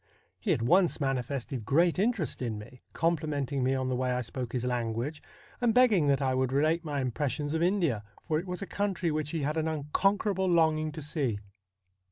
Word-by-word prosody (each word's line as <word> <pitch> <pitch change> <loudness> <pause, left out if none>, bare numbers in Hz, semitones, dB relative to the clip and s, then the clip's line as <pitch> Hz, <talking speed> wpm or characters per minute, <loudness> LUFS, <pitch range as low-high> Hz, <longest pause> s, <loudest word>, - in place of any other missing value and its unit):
He - - -1
at - - +1
once 175 +8 +3
manifested 135 -2 -2
great 165 - +3
interest 210 - 0
in 115 -4 -2
me; 120 +4 -11
complimenting 145 -5 0
me 130 +1 +2
on 130 -1 -1
the 130 - 0
way 130 0 0
I 125 0 0
spoke 125 0 -5
his 125 -1 -1
language, 125 +4 -2 0.4
and 235 -2 +2
begging 220 -11 +5
that 140 0 +2
I 130 -1 +1
would 130 0 0
relate 155 +5 +2
my 145 -3 -2
impressions 145 +3 -2
of 160 - 0
India, 170 - +1 0.2
for 155 -2 +1
it 180 - -7
was 180 +2 -3
a - - -3
country 190 -4 -1
which 150 -1 -2
he 160 -2 -2
had 150 +3 -1
an 160 0 0
unconquerable 190 +6 +1
longing 160 -2 +3
to 155 0 -6
see. 140 -7 -1
150 Hz, 200 wpm, -29 LUFS, 130-170 Hz, 0.4 s, begging